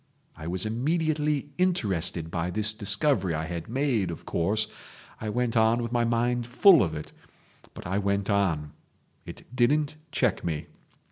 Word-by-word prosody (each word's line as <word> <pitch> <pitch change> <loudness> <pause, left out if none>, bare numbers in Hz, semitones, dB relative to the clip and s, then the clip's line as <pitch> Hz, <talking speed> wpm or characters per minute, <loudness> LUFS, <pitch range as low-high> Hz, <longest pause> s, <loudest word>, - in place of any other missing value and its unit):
I 80 - -8
was 90 +3 -1
immediately 150 +4 0
interested 95 - 0
by 85 +1 -1
this 105 +3 0
discovery 100 - +2
I 80 +1 -2
had 85 +1 -6
made, 125 -7 0
of 85 - -7
course—I 105 +3 -3
went 120 +1 -1
on 115 +1 +3
with 115 - -4
my 120 -1 +2
mind 120 +1 0
full 170 +5 +6
of 80 -4 0
it—but 75 - -13
I 95 +3 -1
went 100 0 0
on. 85 -8 0 0.6
It - - -9
didn't 145 +5 +2
check - - 0
me. 80 -3 -3
110 Hz, 145 wpm, -27 LUFS, 90-125 Hz, 0.6 s, full